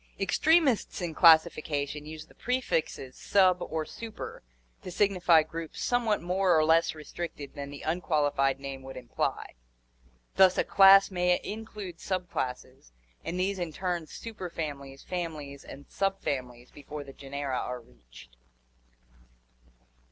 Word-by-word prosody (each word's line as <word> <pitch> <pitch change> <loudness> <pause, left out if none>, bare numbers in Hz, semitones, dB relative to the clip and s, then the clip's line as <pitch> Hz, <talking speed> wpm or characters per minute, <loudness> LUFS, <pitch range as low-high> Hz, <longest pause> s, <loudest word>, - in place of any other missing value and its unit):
Extrem 315 - +4
ists 240 -6 0
in 175 -3 -3
classification 155 -3 +3
use 155 0 -8
the - - -21
prefixes 165 - -2
sub 185 -2 +3
or 160 -1 -3
super 225 +4 -8 0.4
to - - -8
signify 180 -4 +4
groups 165 +1 -7
somewhat 230 -6 +1
more 180 -1 +2
or 155 - +4
less 165 +1 +3
restricted 155 -1 -7
than 140 0 -6
the 145 0 -9
unqualified 145 -5 +1
name 135 -1 -6
would 135 0 -9
imply; 125 -2 -3 0.8
thus, 190 -1 +6
a - - +3
class 195 0 +7
may 180 -1 +2
include 210 -4 -7
subclasses 135 - -4 0.3
and 180 - -4
these 190 +1 0
in 175 -2 -3
turn 175 0 -3
super 210 -3 -7
families, 140 -4 -6
families, 155 -6 -5
and 140 +1 -11
subfamilies 130 -11 -3
before 145 0 -8
the 135 -1 -12
genera 140 -1 -4
are 125 0 -4
reached. - - -18
160 Hz, 130 wpm, -29 LUFS, 140-185 Hz, 0.8 s, class